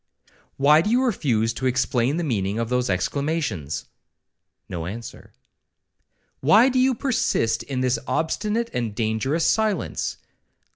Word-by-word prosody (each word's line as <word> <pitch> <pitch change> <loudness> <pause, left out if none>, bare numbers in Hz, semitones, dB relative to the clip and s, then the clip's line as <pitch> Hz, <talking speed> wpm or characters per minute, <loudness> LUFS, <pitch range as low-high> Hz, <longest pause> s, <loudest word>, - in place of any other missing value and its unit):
'Why 150 +3 +5
do 210 - -1
you 245 +3 +3
refuse 120 - +1
to 130 - -2
explain 130 +2 +1
the 175 - -1
meaning 105 - -1
of 115 -1 -2
those 125 -2 0
exclamations?'—No 95 - -4
answer. 115 +4 -8 1.1
'Why 215 - +5
do 260 0 +1
you 260 0 +3
persist 225 - 0
in 130 -2 -3
this 130 -1 +1
obstinate 215 +8 -1
and 115 -4 -2
dangerous 115 +9 0
silence? 215 -5 0
130 Hz, 125 wpm, -23 LUFS, -, 1.1 s, Why